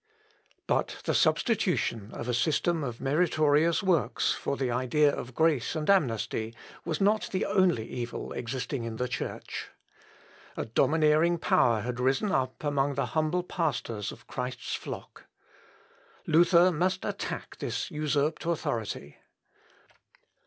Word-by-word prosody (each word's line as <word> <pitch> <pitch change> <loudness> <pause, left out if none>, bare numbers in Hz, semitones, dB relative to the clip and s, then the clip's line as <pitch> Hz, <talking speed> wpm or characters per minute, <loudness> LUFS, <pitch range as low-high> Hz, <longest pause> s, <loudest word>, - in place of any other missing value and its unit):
] - - -40 0.2
But - - -1
the - - +1
substitution 175 - +1
of - - -6
a 125 - 0
system 155 +5 +1
of 120 -3 -4
meritorious 155 +3 +2
works 180 -5 +2
for 140 - -3
the 130 -3 -1
idea 135 +4 +2
of 125 0 -7
grace 160 -4 +2
and 155 -1 -2
amnesty 115 - 0 0.3
was 160 -3 -2
not 210 +2 +2
the 190 - 0
only 185 - +2
evil 120 -1 -5
existing 125 +1 -3
in 115 -1 -4
the 125 +3 -2
Church. 130 - -5 0.9
A - - -2
domineering 155 +7 +3
power 115 -8 +3
had 125 +2 -4
risen 135 +11 +1
up 130 -4 -1
among 145 -1 +1
the 140 -1 0
humble 155 +3 +1
pastors 125 - -2
of - - -13
Christ's 125 0 -4
flock. - - -7 1.0
Luther 170 +2 +5
must 180 +3 0
attack - - -5
this - - -3
usurped 150 0 0
authority. 110 - -3
145 Hz, 130 wpm, -28 LUFS, 125-170 Hz, 1.0 s, Luther